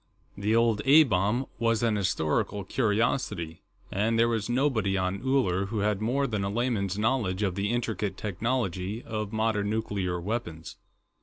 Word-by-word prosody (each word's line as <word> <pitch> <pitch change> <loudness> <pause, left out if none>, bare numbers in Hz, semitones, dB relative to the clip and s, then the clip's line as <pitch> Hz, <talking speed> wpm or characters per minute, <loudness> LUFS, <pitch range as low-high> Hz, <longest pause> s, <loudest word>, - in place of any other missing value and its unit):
The 105 +3 0
old 115 -2 +3
A 150 +4 +8
bomb 110 +2 +1
was 115 -1 +1
an 115 -2 +2
historical 95 0 0
curiosity, 105 -6 -1 0.3
and 110 +4 +1
there 115 +1 +4
was 115 -1 -1
nobody 120 -7 +1
on 95 +2 -1
Uller 125 -8 +1
who 105 0 -2
had 105 -1 0
more 130 +6 +1
than 105 -6 -2
a 100 - -1
layman's 105 -4 -1
knowledge 105 -4 0
of 95 -3 0
the 100 +2 -1
intricate 110 -4 -2
technology 105 -1 -2
of 110 -2 -4
modern 110 -2 0
nuclear 100 -5 -2
weapons. 85 -5 -4
105 Hz, 155 wpm, -28 LUFS, 100-115 Hz, 0.3 s, A